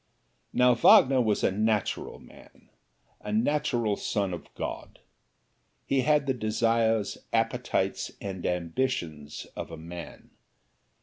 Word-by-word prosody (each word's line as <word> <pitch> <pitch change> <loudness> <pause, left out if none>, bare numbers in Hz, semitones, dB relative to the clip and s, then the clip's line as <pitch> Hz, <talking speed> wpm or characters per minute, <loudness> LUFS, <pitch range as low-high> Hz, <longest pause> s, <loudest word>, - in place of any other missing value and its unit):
Now 125 0 +4
Wagner 130 +2 +6
was 110 -3 +1
a - - +3
natural 105 0 -1
man - - -18 0.5
a 105 - -6
natural 115 -2 +1
son 100 -3 -2
of 85 - -8
God. - - -6 0.9
He 135 -1 +1
had 150 +1 +3
the 135 - +1
desires, 115 -1 +1
appetites 115 -4 0
and 95 -3 -6
ambitions 85 - -2
of - - -6
a 80 - -8
man. 85 +2 -10
110 Hz, 115 wpm, -28 LUFS, 95-125 Hz, 0.9 s, Wagner